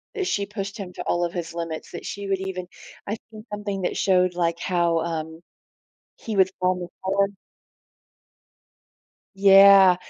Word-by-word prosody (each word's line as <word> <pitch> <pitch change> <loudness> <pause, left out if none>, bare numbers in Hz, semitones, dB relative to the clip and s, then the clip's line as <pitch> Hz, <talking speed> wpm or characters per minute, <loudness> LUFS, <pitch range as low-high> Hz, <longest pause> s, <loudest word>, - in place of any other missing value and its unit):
That 385 -3 -2
she 200 -1 0
pushed 200 +1 -6
him 185 -3 -7
to - - -6
all 175 0 0
of 170 - -5
his 170 -2 -5
limits, 165 -2 -5
that - - -8
she 200 -1 -5
would 195 -1 0
even 185 -2 -5 0.4
I 210 +2 -2
think 215 +1 -11
something 205 -2 -4
that 180 - -2
showed, 185 -2 +2
like, 170 -1 0
how, 170 -2 +1
um, 160 0 -4 0.8
he 220 -2 -5
would 190 -1 +4
fall 185 0 +3
on 180 - -7
the 175 - -5 0.2
floor. 195 +1 +1 2.1
Yeah, 195 -1 +8
190 Hz, 165 wpm, -24 LUFS, 175-200 Hz, 2.1 s, Yeah